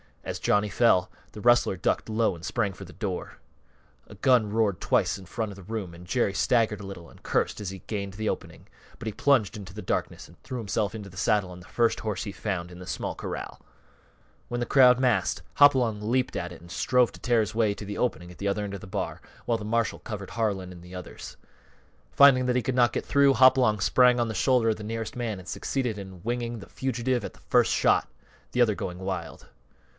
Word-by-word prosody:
As - - -4
Johnny 105 0 +2
fell, 95 -4 +3 0.2
the 105 - -8
rustler 120 -4 +4
ducked 90 - -1
low 110 -2 +1
and 85 - -13
sprang 105 -5 -1
for 95 +2 -10
the 90 - -13
door. 95 -5 -5 0.7
A - - -12
gun 125 -5 +3
roared 105 -4 +1
twice - - +1
in 95 - -12
the - - -19
front 110 -2 -3
of - - -9
the 95 - -12
room 100 -3 -5
and 85 +1 -12
Jerry 110 -1 +1
staggered 110 -1 +2
a 100 - -8
little 90 -4 -9
and - - -18
cursed - - 0
as 100 -3 -4
he 95 0 -8
gained 100 -3 -4
the 110 +2 -2
opening, - - -6 0.3
but 115 - -7
he - - -1
plunged 115 -4 +2
into 95 -3 -9
the 105 - -7
darkness - - -3
and - - -20
threw 130 - -6
himself 105 -1 -1
into 105 -2 -7
the 90 - -14
saddle 100 -2 +1
on 90 - -10
the 90 - -14
first 115 -1 +1
horse 105 -4 -3
he 100 - -5
found 95 -3 -4
in 90 - -11
the 90 - -10
small - - -3
corral. - - -6 0.9
When 120 - -3
the 120 - -1
crowd 125 -1 +6
massed, 125 -3 +1
Hopalong 125 -7 +5
leaped 125 +4 0
at 90 - -3
it 85 - -11
and 85 0 -13
strove 125 +4 +2
to - - -12
tear 120 -2 +2
his 110 +1 -3
way 110 -2 +2
to 105 - -8
the 100 +1 -5
opening 90 -8 -2
at 90 - -14
the 100 - -2
end 100 0 -2
of 100 - -6
the - - -10
bar, 100 +1 -4 0.2
while 115 - +1
the 105 - -7
marshal 115 0 0
covered 100 -4 -7
Harlan 100 -5 -1
and 90 -1 -11
the 90 +1 -11
others. 90 - -9 0.8
Finding 135 -3 +6
that 125 - +1
he 125 - +1
could 130 -2 -1
not 120 -1 +4
get - - -2
through, 140 -1 +4
Hopalong 125 -3 +5
sprang 125 +6 +4
on 120 -1 +1
the - - -3
shoulder 120 +2 +3
of 110 - 0
the 105 - -8
nearest 115 +1 -4
man 115 -4 -3
and 90 - -13
succeeded 125 -1 -2
in 95 -3 -10
winging 120 0 -2
the 100 - -12
fugitive 125 -2 -1
at - - -7
the - - -20
first - - +3
shot, - - +3 0.4
the 125 - +1
other 110 -4 +4
going 90 -2 -5
wild. 95 -1 -5
110 Hz, 235 wpm, -27 LUFS, 95-120 Hz, 0.9 s, crowd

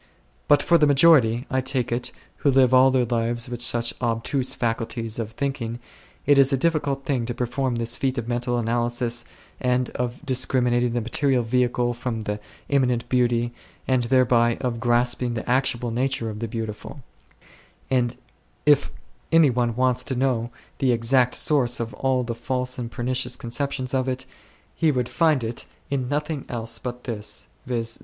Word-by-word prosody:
But 145 - +5
for 170 -1 +4
the 150 - +5
majority, 135 -5 +5
I 130 +1 +1
take 130 -2 -1
it, 120 +1 -2 0.3
who 145 - +1
live 130 -2 +4
all 130 +1 +7
their 130 -2 +2
lives 115 0 -1
with 120 -1 -5
such 120 -1 +1
obtuse 125 +3 0
faculties 115 -1 -2
of 115 -1 -4
thinking, 130 -3 -3 0.5
it 145 0 +5
is 135 0 +5
a 135 - +2
difficult 145 -2 0
thing 125 -5 -1
to 120 - -3
perform 125 +1 -1
this 115 +1 -2
feat 135 0 -1
of 120 -1 -3
mental 120 0 -1
analysis 120 +1 -1 0.3
and 125 0 0
of 125 +4 -4
discriminating 125 -2 +2
the 120 - 0
material 125 +2 +1
vehicle 120 +1 +1
from 120 -2 -4
the 105 -1 -3 0.3
immanent 125 -4 +1
beauty, 120 -1 +1 0.3
and 130 -2 +2
thereby 120 -2 +3
of 120 -3 -2
grasping 120 0 +1
the 110 - -5
actual 125 -2 +1
nature 125 -1 -1
of 105 - -8
the 115 - -3
Beautiful; 110 +4 -6 0.9
and 125 -2 +1 0.5
if 145 -1 +4 0.4
any 165 -4 +6
one 120 -1 0
wants 125 0 +2
to 130 - -2
know 125 -2 0 0.3
the 130 -2 +3
exact 120 +2 +2
source 130 -5 +2
of 115 -1 -4
all 130 -1 0
the 120 -1 -3
false 125 +2 -2
and 120 -1 -4
pernicious 125 0 -1
conceptions 130 +2 -3
of 130 0 +1
it, 130 0 -3 0.5
he 160 -2 +2
would 125 -3 -1
find 155 -5 +2
it 115 +1 -4 0.2
in 130 -3 -1
nothing 150 0 -2
else 115 -1 -3
but 125 -1 -6
this, 105 -4 -5 0.2
viz. 115 -2 -2
125 Hz, 170 wpm, -24 LUFS, 120-130 Hz, 0.9 s, all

